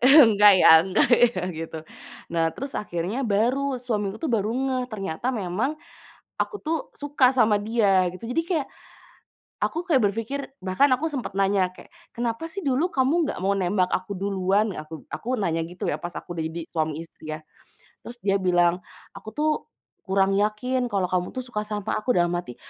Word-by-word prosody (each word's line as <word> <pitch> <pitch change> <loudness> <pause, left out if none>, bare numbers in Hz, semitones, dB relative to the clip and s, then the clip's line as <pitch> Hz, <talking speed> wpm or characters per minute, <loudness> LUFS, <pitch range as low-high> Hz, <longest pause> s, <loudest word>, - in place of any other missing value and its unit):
Enggak 225 -8 +8
ya - - +8
enggak 190 +4 +2 0.2
ya, 185 -4 -3
gitu. 160 0 -6 0.5
Nah, 165 -1 +2
terus 275 0 -6
akhirnya 190 +6 -3
baru, 250 +6 +1
suami 210 -5 -1
aku 220 - -10
tuh - - -2
baru 215 -1 +1
ngeh, 260 0 -1
ternyata 195 +4 -3
memang 220 - -2 0.7
aku 415 - -3
tuh 320 +1 0 0.2
suka 285 -3 +3
sama 220 -4 +4
dia, 205 -4 +3
gitu. 185 +5 -9
Jadi, 265 +7 +1
kayak 330 -6 -1 1.0
aku 340 +3 -2
kayak 265 -9 +3
berpikir 230 +6 -4 0.2
bahkan 190 +10 +2
aku 260 +6 +2
sempet 280 -6 -4
nanya 195 -2 +2
kayak 185 - -15 0.2
"Kenapa 240 +7 -3
sih 395 - -5
dulu 290 +8 +1
kamu 285 +4 +2
nggak - - -7
mau 195 +2 +1
nembak 185 0 +1
aku 185 +2 -5
duluan?" 195 +1 0
Aku 155 0 -8
aku 250 0 -3
nanya 165 -4 0
gitu 175 +2 -6
ya - - 0
pas 175 - -5
aku 175 - -9
jadi 160 0 -4
suami 155 -1 -2
istri, 155 -1 -10
ya. 155 - -9 0.6
Terus 240 - -9
dia 195 -1 +3
bilang, 175 -1 +2 0.3
"Aku 200 +2 -9
tuh 305 +1 +2 0.6
kurang 195 0 +2
yakin, 245 +5 0
kalau 195 -2 +1
kamu 180 -1 0
tuh 255 - -3
suka 220 -4 -3
sama 210 -2 -3
aku." 245 +1 0
Dalam 175 0 +2
hati, 175 -9 -5
210 Hz, 175 wpm, -25 LUFS, 180-255 Hz, 1.0 s, Enggak